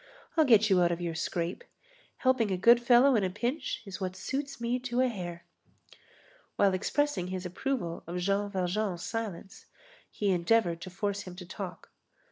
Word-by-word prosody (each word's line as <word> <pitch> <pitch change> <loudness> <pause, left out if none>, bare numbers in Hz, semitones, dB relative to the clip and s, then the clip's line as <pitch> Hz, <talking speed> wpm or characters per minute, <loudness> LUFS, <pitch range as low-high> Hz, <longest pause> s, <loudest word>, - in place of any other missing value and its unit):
I'll 320 -2 +5
get 220 -5 +6
you 190 -3 +4
out 175 0 +3
of 170 - -2
your 170 -1 -3
scrape. 170 - -3 0.5
Helping 255 -5 +2
a 190 - 0
good 235 +6 +6
fellow 245 +2 +6
in 210 - +2
a 185 - +1
pinch 240 - -3
is 195 0 -8
what 185 -1 -3
suits 275 +7 -4
me 235 +2 -1
to 250 -1 -2
a 260 - +4
hair." 175 -7 -6 1.1
While 200 -2 +3
expressing 200 0 0
his 185 0 -4
approval 180 -2 -3
of 175 +1 -4
Jean 200 +3 0
Valjean's 185 -1 -1
silence, 215 -5 -5 0.4
he 205 -2 0
endeavored 175 -1 +2
to 185 - -7
force 200 +2 -2
him 180 -3 -9
to 180 0 -9
talk. 175 - -8
200 Hz, 175 wpm, -30 LUFS, 180-240 Hz, 1.1 s, get